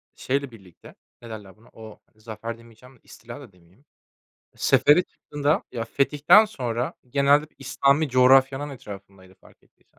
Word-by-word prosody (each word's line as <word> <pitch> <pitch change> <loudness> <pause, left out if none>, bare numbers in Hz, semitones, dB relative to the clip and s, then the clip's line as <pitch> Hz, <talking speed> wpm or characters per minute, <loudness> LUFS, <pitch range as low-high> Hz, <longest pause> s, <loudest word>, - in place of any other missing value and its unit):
şeyle 140 0 -3
birlikte, 95 -6 -17 0.3
ne 120 - -12
derler 105 -2 -11
buna? 115 - -22
O, 110 -1 -13 0.2
zafer 110 +1 -8
demeyeceğim 115 +3 -19
de - - -26
istila 120 +4 -12
da 120 -7 -14
demeyeyim. 90 - -27 0.7
Sefere 150 +5 +4
çıktığında, 145 +1 -3
ya, 115 -2 -5
fetihten 150 - +4
sonra 125 - -4 0.2
genelde 145 +2 +2
İslami 140 +2 0
coğrafyanın 135 +3 +3
etrafındaydı 100 -6 -12
fark - - -22
ettiysen. - - -34
125 Hz, 140 wpm, -23 LUFS, 110-140 Hz, 0.7 s, Sefere